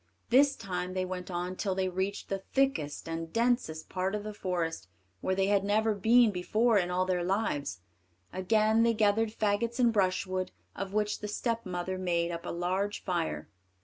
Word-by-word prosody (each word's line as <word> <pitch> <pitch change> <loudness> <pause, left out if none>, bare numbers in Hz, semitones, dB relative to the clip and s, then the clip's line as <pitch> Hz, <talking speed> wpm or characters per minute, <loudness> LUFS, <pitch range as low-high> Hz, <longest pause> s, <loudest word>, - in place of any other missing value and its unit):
This 275 +2 +5
time 180 -3 -4
they 185 0 0
went 180 0 -5
on 180 +1 -3
till 190 -1 -1
they 190 0 0
reached 190 +2 -3
the 195 -1 -2
thickest 220 - +1
and 165 0 -4
densest 230 -9 0
part 190 +2 -1
of 210 - -3
the 215 0 -5
forest, 170 - -2 0.3
where 190 - 0
they 190 0 +2
had 200 0 +2
never 215 +2 +2
been 225 +3 +5
before 215 +4 +2
in 180 -1 -1
all 180 +1 +1
their 180 -1 0
lives. 175 - -1 0.5
Again 215 +4 +3
they 230 0 +3
gathered 215 +1 +3
faggots 220 +2 0
and 240 -2 +4
brushwood, 185 -2 0 0.2
of 195 -1 -4
which 210 0 0
the 210 - -5
stepmother 185 -5 -2
made 170 -2 0
up 170 0 -5
a - - -3
large 185 +4 -1
fire. 170 -3 -2
190 Hz, 180 wpm, -30 LUFS, 180-215 Hz, 0.5 s, This